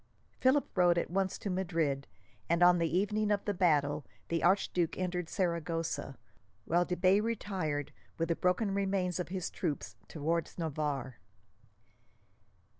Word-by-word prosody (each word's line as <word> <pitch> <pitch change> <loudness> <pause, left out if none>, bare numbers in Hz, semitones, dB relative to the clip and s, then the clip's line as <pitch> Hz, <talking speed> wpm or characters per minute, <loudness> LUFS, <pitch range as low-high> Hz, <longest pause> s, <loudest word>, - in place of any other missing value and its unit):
Philip 265 +2 +3
rode 175 -2 +4
at 170 - -1
once 190 0 0
to 200 - -4
Madrid, 165 -7 -1 0.4
and 170 +1 +3
on 175 0 +6
the 165 -1 +1
evening 210 +2 +1
of 205 -1 +1
the 205 - 0
battle 150 -5 +2 0.3
the 165 -1 0
archduke 175 -2 +2
entered 180 -2 -2
Saragossa; 165 -6 -2 0.5
while 175 +2 +2
de 180 - -2
Bay 185 +2 +4
retired, 185 -10 -2 0.3
with 165 0 -1
the 170 - +2
broken 190 +4 +1
remains 190 -2 0
of 180 - -2
his 185 -1 -3
troops, 140 - -3
towards 165 +2 -2
Navarre. 145 -7 -3
175 Hz, 140 wpm, -32 LUFS, 160-190 Hz, 0.5 s, on